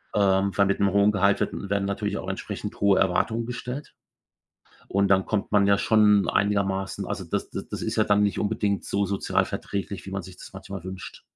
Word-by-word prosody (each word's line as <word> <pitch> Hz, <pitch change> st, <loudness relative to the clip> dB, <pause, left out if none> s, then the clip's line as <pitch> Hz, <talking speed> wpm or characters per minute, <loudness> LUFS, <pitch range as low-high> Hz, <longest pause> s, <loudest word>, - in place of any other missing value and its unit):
Ähm, 100 Hz, -1 st, +3 dB
weil 100 Hz, -, +5 dB
mit 100 Hz, -, 0 dB
'nem 100 Hz, -1 st, +3 dB
hohen 100 Hz, +1 st, +4 dB
Gehalt 100 Hz, 0 st, +2 dB
wird -, -, 0 dB
werden 100 Hz, 0 st, -2 dB
natürlich 100 Hz, +1 st, -2 dB
auch -, -, -5 dB
entsprechend -, -, -5 dB
hohe 100 Hz, -1 st, +4 dB
Erwartungen 110 Hz, +5 st, +1 dB
gestellt. 125 Hz, +3 st, -6 dB, 0.9 s
Und 100 Hz, +1 st, +2 dB
dann 95 Hz, -1 st, +4 dB
kommt 105 Hz, -2 st, -2 dB
man 100 Hz, -1 st, +4 dB
ja 100 Hz, -, +4 dB
schon 105 Hz, -2 st, +4 dB
einigermaßen 95 Hz, -1 st, 0 dB
also, -, -, -4 dB
das -, -, -3 dB
das -, -, -6 dB
ist -, -, -2 dB
ja -, -, +4 dB
dann 105 Hz, 0 st, +3 dB
nicht 100 Hz, -, 0 dB
unbedingt 105 Hz, -1 st, 0 dB
so 100 Hz, 0 st, 0 dB
sozialverträglich, 100 Hz, 0 st, -2 dB
wie 95 Hz, -, -7 dB
man 100 Hz, -, -3 dB
sich 95 Hz, 0 st, -12 dB
das -, -, -11 dB
manchmal 95 Hz, -1 st, -8 dB
wünscht. 95 Hz, 0 st, -8 dB
100 Hz, 195 wpm, -25 LUFS, 95-105 Hz, 0.9 s, weil